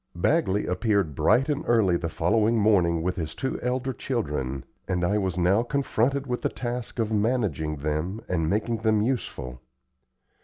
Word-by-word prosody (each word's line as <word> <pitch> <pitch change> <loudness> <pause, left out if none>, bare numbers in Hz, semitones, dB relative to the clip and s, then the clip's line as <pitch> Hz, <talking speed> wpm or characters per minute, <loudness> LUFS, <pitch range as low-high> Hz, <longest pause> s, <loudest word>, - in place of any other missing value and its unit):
Bagley 105 - +1
appeared 95 -3 +1
bright 125 - +3
and 150 -1 -1
early 110 -7 +3
the 85 -1 -2
following 105 +7 +2
morning 90 -6 +3
with 90 +1 -1
his 80 -2 -4
two 130 - -3
elder 130 +1 -1
children, 70 - -3 0.2
and 90 -1 -1
I 105 +4 +1
was 95 -3 -2
now 90 +5 +3
confronted 140 +1 0
with 125 -2 -3
the - - 0
task 120 -1 -5
of 110 -2 0
managing 105 - 0
them 75 +7 -2
and 80 -3 0
making 110 +3 0
them 110 -1 +2
useful. 65 - -3
105 Hz, 160 wpm, -26 LUFS, 85-120 Hz, 0.2 s, bright